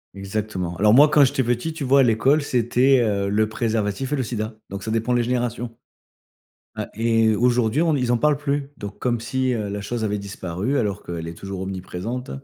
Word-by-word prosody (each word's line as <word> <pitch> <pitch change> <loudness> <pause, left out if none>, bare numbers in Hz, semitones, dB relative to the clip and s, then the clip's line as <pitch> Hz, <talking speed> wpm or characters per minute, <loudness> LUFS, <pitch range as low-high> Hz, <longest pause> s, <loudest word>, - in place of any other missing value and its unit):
Exactement. 100 -3 -4
Alors 105 +2 +4
moi, 145 +4 +7
quand 150 -1 +6
j'étais 135 0 0
petit, 120 +7 -1
tu 155 -3 -5
vois, 135 +1 +5
à - - +5
l'école, 130 +6 +3
c'était, 125 +1 +3
heu, 100 -3 0
le 110 +1 +1
préservatif 110 +4 -1
et - - +3
le 135 - -1
sida. 110 -1 -4
Donc, 100 0 -6
ça 110 - -3
dépend 115 +2 0
les 120 -1 +2
générations. 120 -1 -2 1.0
Ouais - - -2
et 115 0 +2
aujourd'hui, 125 +3 +2
on 165 -2 +2
ils 125 -4 0
en - - +3
parlent 150 +3 +2
plus. 140 -1 -2
Donc 100 0 -7
comme 120 -2 -1
si, 130 +2 -1
heu, 105 -3 -2
la 100 0 -4
chose 115 +1 -3
avait 105 -1 0
disparu 100 +5 -3
alors 105 -2 -1
qu'elle 85 -1 -6
est 85 - -7
toujours 95 +1 -7
omniprésente 95 +6 -5
115 Hz, 205 wpm, -22 LUFS, 105-130 Hz, 1.0 s, moi